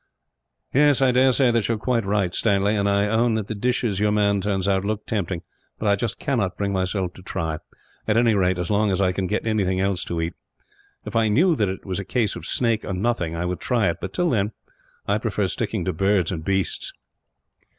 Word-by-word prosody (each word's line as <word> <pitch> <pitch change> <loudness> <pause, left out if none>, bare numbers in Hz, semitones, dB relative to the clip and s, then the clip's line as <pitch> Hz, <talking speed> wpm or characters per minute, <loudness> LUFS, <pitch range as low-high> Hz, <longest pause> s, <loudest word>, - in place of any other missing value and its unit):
"I 140 -2 +4
dare 130 +1 +4
say 130 -1 +3
that 115 -3 +1
you 115 - +1
are - - -5
quite 115 0 0
right, 100 -3 +1
Stanley, 100 -1 +2
and 100 -1 +1
I 100 0 +2
own 115 +2 +2
that 110 -2 -1
the 105 - -4
dishes 115 -2 0
your 105 0 +2
man 100 -1 +2
turns 95 -1 -1
out 95 -1 +2
look 105 +1 -3
tempting; 95 -5 -2 0.3
but 110 - -2 0.2
I - - +2
cannot 115 -10 -1
bring 100 -1 -1
myself 95 -1 -1
to - - -13
try, 80 -3 -3 0.5
at 105 0 +2
any 115 -1 +4
rate 95 -2 +2
as 90 +3 -2
long 105 +1 +2
as 95 -1 0
I 95 -2 +3
can 95 0 -2
get 105 +4 -2
anything 100 -4 +1
else 95 -2 0
to 85 - -3
eat. 80 +1 -2 0.7
If - - -7
I 115 -1 +3
knew 160 - +4
that 105 -8 +1
it 95 - -6
was 95 -1 -2
a - - -3
case 105 +1 0
of - - -7
snake, 115 -3 +1
or 100 - -4
nothing, 90 -4 -1
I 85 +1 -2
would 90 0 -2
try 115 -7 +1
it; - - -8
but 95 - -4
till 175 - 0
then, 105 -2 0 0.5
I - - +1
prefer - - -1
sticking - - -2
to 95 - -1
birds 95 +1 +1
and 80 -4 -4
beasts." 95 +1 -1
100 Hz, 225 wpm, -23 LUFS, 95-115 Hz, 0.7 s, I